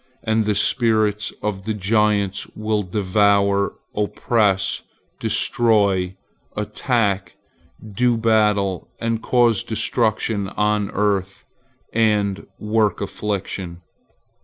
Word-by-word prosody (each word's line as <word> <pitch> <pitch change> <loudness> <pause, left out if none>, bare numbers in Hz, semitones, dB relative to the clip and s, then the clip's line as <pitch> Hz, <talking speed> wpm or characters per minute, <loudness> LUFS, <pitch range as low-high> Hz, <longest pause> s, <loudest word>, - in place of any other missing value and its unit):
And 110 -1 +1
the 105 -1 +1
spirits 110 -1 +1
of 100 -2 -3
the 110 -1 -2
giants 105 -1 +1
will 110 -1 -1
devour, 100 0 +2 0.2
oppress, 105 -1 +1 0.4
destroy, 100 -6 +2 0.4
attack, 105 -2 -1 0.6
do 120 +2 +2
battle, 105 -4 +1
and 115 -1 -1
cause 120 -4 +3
destruction 110 -3 -1
on 105 -1 +1
the - - -11
earth, 100 -2 -1 0.5
and 105 -3 +1
work 105 -1 +1
affliction. 95 -4 -4
105 Hz, 90 wpm, -21 LUFS, 100-110 Hz, 0.6 s, cause